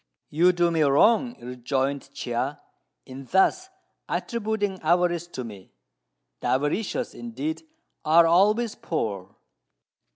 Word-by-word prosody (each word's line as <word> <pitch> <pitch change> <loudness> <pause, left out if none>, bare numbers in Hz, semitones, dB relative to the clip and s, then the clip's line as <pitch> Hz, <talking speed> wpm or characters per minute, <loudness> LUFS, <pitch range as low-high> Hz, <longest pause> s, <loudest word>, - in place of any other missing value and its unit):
"You 175 +4 +4
do 175 -1 +1
me 165 -1 +1
wrong," 220 - +3
rejoined 130 +3 -3
Chia, 125 +4 -3 0.5
"in 135 +1 -10
thus 280 - +2 0.4
attributing 215 -4 -2
avarice 175 +1 +1
to 130 -7 -6
me. 100 - -11 0.7
The - - -4
avaricious, 185 - -1
indeed, 290 +7 -5 0.4
are 165 +2 +6
always 210 +7 +3
poor." 100 - -4
170 Hz, 105 wpm, -25 LUFS, 135-210 Hz, 0.7 s, are